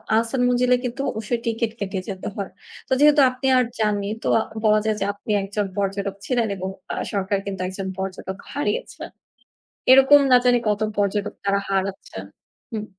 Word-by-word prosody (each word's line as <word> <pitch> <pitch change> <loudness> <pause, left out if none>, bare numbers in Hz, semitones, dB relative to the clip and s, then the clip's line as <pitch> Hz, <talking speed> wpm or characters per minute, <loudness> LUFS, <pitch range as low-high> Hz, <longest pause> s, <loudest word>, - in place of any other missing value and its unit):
আহসান 230 +3 +1
মঞ্জিলে 250 0 +3
কিন্তু 250 +3 -3
অবশ্যই 220 +2 -3
ticket 230 -1 -1
কেটে 195 -1 -3
যেতে 190 -1 -5
হয়, 200 -2 -5 0.4
তো - - -27
যেহেতু 295 0 +6
আপনি 255 +1 -3
আর 250 - +4 0.2
যাননি 205 -2 0
তো - - -2 0.4
বলা 215 0 +5
যায় 215 -1 +1
যে, 195 - 0
আপনি 205 +1 -6
একজন 205 +1 -2
পর্যটক 200 0 -2
ছিলেন 240 -3 +1
এবং 190 0 -4 0.2
আ - - -3 0.2
সরকার 200 -1 0
কিন্তু 195 -2 -4
একজন 190 0 -5
পর্যটক 190 0 -5 0.2
হারিয়েছেন। 460 - -3 0.8
এরকম 270 +2 +8
না - - +9
জানি 245 -1 +5
কত 210 0 +1 0.2
পর্যটক 205 0 0
তারা 200 0 +2
হারাচ্ছেন। 195 - -3 0.5
হুম। 215 -1 -3
210 Hz, 165 wpm, -23 LUFS, 195-245 Hz, 0.8 s, না